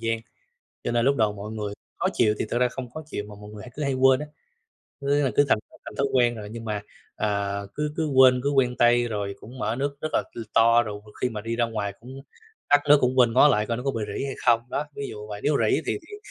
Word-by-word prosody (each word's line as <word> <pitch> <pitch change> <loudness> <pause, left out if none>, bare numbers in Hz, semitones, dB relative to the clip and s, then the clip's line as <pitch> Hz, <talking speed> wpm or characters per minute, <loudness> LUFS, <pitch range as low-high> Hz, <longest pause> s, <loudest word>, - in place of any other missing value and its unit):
gian. 115 0 0 0.7
Cho - - -1
nên 120 0 +2
lúc 140 +1 +4
đầu 110 -4 +2
mọi 105 +1 -7
người 105 -2 -4 0.3
khó - - -1
chịu 110 -3 +3
thì - - 0
thực - - -1
ra 125 0 +3
không 125 0 -7
khó 155 +6 -7
chịu, 140 -8 -5
mà 105 - -10
mọi 105 - -10
người 105 -1 -10
hay 125 - -11
cứ 150 - -3
hay 140 -1 0
quên 130 0 +4
á. 150 - -4 0.8
Cứ, 140 +1 +1
à, - - +1
cứ 145 - +6
thành - - +4
th - - -43 0.2
thành - - -9
thói 140 - +2
quen 120 -2 +3
rồi 105 -2 -7
nhưng 115 0 -7
mà, 105 -2 -2 0.4
à, 100 -1 -1
cứ 150 0 -2
cứ 160 - 0
quên, 130 -3 +6
cứ 140 - +1
quen 130 -3 +2
tay, 120 0 +4
rồi 100 -3 -3
cũng 125 +4 -11
mở 115 -3 -1
nước 140 +1 -2
rất 155 - -2
là, - - +2
ừm, 115 - -6
to, 115 +1 +6
rồi 105 -2 -6
m 105 - -17
khi 125 - +3
mà 110 -3 -5
đi 115 +2 -3
ra 120 - +2
ngoài 110 -3 -3
cũng 130 +3 -10 0.5
tắt 145 0 +6
nước 145 0 +8
cũng 130 +1 +1
quên 120 -2 +5
ngó 130 +5 +7
lại 105 -6 +2
coi 115 0 -1
nó 125 - -5
có 135 - 0
bị 115 -4 -3
rỉ - - -2
hay 135 - -3
không, 115 -1 +5
đó, 150 - -2
ví 140 - -5
dụ 105 -1 -8
vậy. 105 -1 -7
Nếu 145 -1 +3
rỉ - - +3
thì - - -1
thì 415 - -8
120 Hz, 285 wpm, -25 LUFS, 110-135 Hz, 0.8 s, nước